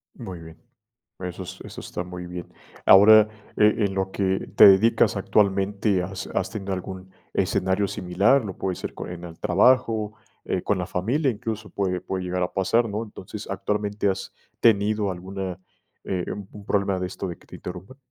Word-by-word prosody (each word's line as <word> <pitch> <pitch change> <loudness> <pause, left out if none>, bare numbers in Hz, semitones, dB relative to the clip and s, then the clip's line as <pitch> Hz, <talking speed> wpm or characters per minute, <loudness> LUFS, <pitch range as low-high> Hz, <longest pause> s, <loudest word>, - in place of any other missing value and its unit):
Muy 90 -2 -8
bien. 80 0 -12 0.6
Eso 90 0 -5
es 90 0 -9
eso - - -9
está - - -5
muy 90 0 -7
bien. 90 0 -8 0.3
Ahora, 105 +2 +8 0.3
e 105 +1 +4
en 100 -1 -1
lo 95 0 -1
que 95 -1 -1
te - - +9
dedicas 100 +4 +4
actualmente, 100 -1 +1
¿has 95 +1 -5
has - - 0
tenido 100 -2 -3
algún 95 0 -7 0.2
escenario 95 +2 +1
similar? 100 +8 +2
Lo 95 -3 -6
puede 95 -2 -2
ser - - -5
con - - -7
en 90 -1 -7
el 85 -1 -10
trabajo, 110 +1 +3 0.3
eh, 90 - -1
con 100 - 0
la 90 - -2
familia, 125 - 0
incluso 110 -1 -5
puede 90 -2 -1
puede 95 +1 -4
llegar 90 0 -2
a 90 - -2
pasar, 105 +5 +2
¿no?, 105 +2 -3
entonces, 110 - -9
¿actualmente 105 0 -1
has 95 - -3 0.3
tenido 105 -2 +3
alguna, 95 0 -5 0.5
eh 90 -2 -2
un 100 -2 -7
un 105 -1 -11
problema 100 -2 +1
de 90 - -1
esto 90 - -5
de 85 - -7
que - - -22
te - - -10
interrumpan? 90 +8 -8
95 Hz, 180 wpm, -24 LUFS, 90-105 Hz, 0.6 s, te